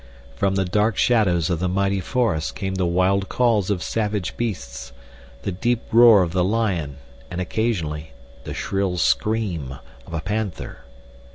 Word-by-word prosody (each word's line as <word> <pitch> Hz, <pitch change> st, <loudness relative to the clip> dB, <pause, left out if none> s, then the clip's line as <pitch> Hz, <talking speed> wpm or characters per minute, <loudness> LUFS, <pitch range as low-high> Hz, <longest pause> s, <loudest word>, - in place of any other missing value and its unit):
From 95 Hz, +4 st, +1 dB
the 95 Hz, -1 st, +1 dB
dark 105 Hz, +3 st, +1 dB
shadows 95 Hz, -8 st, +2 dB
of 85 Hz, -, 0 dB
the 90 Hz, +1 st, 0 dB
mighty 100 Hz, +1 st, +1 dB
forest 100 Hz, -8 st, -1 dB
came 95 Hz, -2 st, -3 dB
the 95 Hz, -2 st, 0 dB
wild 95 Hz, +3 st, +1 dB
calls 115 Hz, -6 st, +2 dB
of 95 Hz, -4 st, -1 dB
savage 105 Hz, -4 st, -2 dB
beasts—the 60 Hz, -, -6 dB
deep 115 Hz, +6 st, -1 dB
roar 115 Hz, -4 st, +7 dB
of 85 Hz, -, -3 dB
the 90 Hz, -1 st, +2 dB
lion, 95 Hz, -9 st, -1 dB, 0.3 s
and, 90 Hz, -, -5 dB
occasionally, 85 Hz, -6 st, -2 dB, 0.3 s
the -, -, -6 dB
shrill 95 Hz, -2 st, -1 dB
scream 80 Hz, -, 0 dB, 0.3 s
of -, -, -10 dB
a -, -, -1 dB
panther. 105 Hz, -1 st, -4 dB
95 Hz, 150 wpm, -22 LUFS, 80-105 Hz, 0.3 s, roar